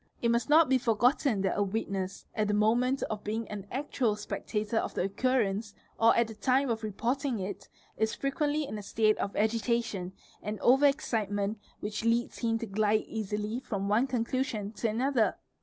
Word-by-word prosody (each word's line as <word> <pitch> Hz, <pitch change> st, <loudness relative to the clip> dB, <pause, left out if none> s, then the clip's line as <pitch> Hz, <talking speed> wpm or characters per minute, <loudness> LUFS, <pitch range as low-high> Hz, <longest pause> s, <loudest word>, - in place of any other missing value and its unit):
BY -, -, -38 dB, 0.2 s
It 235 Hz, -, +4 dB
must 235 Hz, +4 st, 0 dB
not 315 Hz, +2 st, +7 dB
be 260 Hz, 0 st, +3 dB
forgotten 240 Hz, 0 st, +2 dB
that 190 Hz, -1 st, 0 dB
a -, -, 0 dB
witness, 195 Hz, -2 st, -2 dB
at 215 Hz, -1 st, 0 dB
the 210 Hz, -, +1 dB
moment. 240 Hz, +5 st, +2 dB
of 215 Hz, -1 st, -4 dB
being 220 Hz, +2 st, -3 dB
an 200 Hz, -2 st, -6 dB
actual 255 Hz, -4 st, 0 dB
spectator 210 Hz, +1 st, -3 dB
of -, -, -1 dB
the -, -, 0 dB
occurrence, 210 Hz, -1 st, 0 dB, 0.2 s
or 230 Hz, +1 st, +6 dB
at 235 Hz, -1 st, +3 dB
the 225 Hz, -, -8 dB
time 255 Hz, +4 st, +1 dB
of 225 Hz, -, -2 dB
reporting 240 Hz, +5 st, -1 dB
it,: 195 Hz, 0 st, -6 dB, 0.5 s
frequently 290 Hz, +2 st, 0 dB
1 290 Hz, -, -4 dB
in 215 Hz, -, -4 dB
a -, -, -6 dB
state 215 Hz, +1 st, +1 dB
of 200 Hz, -, -2 dB
agitation 220 Hz, -3 st, 0 dB, 0.3 s
and 210 Hz, 0 st, -4 dB
over 270 Hz, +4 st, +6 dB
excitement 215 Hz, -7 st, -1 dB, 0.2 s
which 210 Hz, +1 st, -3 dB
leads 230 Hz, +1 st, +1 dB
him 225 Hz, -1 st, +1 dB
Bh 230 Hz, -, -6 dB
Fb 220 Hz, -, -6 dB
glide 215 Hz, +1 st, +2 dB
easily 215 Hz, +1 st, -3 dB
from 200 Hz, -6 st, -3 dB
one 230 Hz, +6 st, +3 dB
conclusion 235 Hz, -4 st, -1 dB
to 225 Hz, +1 st, -2 dB
another. 245 Hz, +1 st, +1 dB
220 Hz, 190 wpm, -30 LUFS, 210-250 Hz, 0.5 s, not